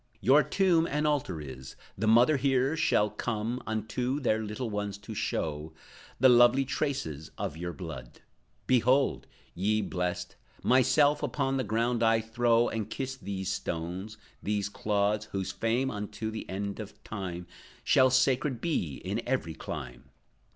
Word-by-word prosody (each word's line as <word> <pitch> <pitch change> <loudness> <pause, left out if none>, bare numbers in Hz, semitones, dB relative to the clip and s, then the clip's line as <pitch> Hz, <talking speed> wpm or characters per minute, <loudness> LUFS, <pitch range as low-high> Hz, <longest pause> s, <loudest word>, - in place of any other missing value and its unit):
Your 140 +4 +5
tomb 170 -2 +2
an 150 +2 -1
altar 140 - 0
is; 65 -3 -9 0.2
the 110 +3 -2
mothers 120 +5 +5
here 135 +2 +2
Shall 105 -9 +2
come, 115 +2 -3
unto 115 +5 -1
their 110 -5 +1
little 110 +2 -4
ones 105 -1 -3
to 100 +2 -9
show 80 -5 -3 0.5
The 130 - +7
lovely 120 +2 +6
traces 130 - -3
of - - -3
your 85 +1 -4
blood. 75 - -8 0.5
Behold, 130 +2 +2 0.3
Ye 105 +4 +1
blessed, 90 -1 -3 0.3
myself 145 +4 +4
upon 135 -1 -1
the 130 - 0
ground 115 +2 0
I 115 0 +4
throw, 115 +1 +2
And 110 -1 -3
kiss 135 +2 -4
these 95 -5 -4
stones, 90 +6 -4 0.2
these 100 -1 -1
clods 105 0 0
Whose 95 -3 -3
fame, 120 +4 0
unto 105 +1 -4
the 110 - -7
end 100 +2 -4
of 105 -1 -9
time, 90 -4 -5 0.4
Shall 130 0 +5
sacred 130 0 +2
be 100 - -1
in 100 +5 -1
every 125 -11 -1
clime. 60 -5 -7
110 Hz, 145 wpm, -29 LUFS, 100-130 Hz, 0.5 s, The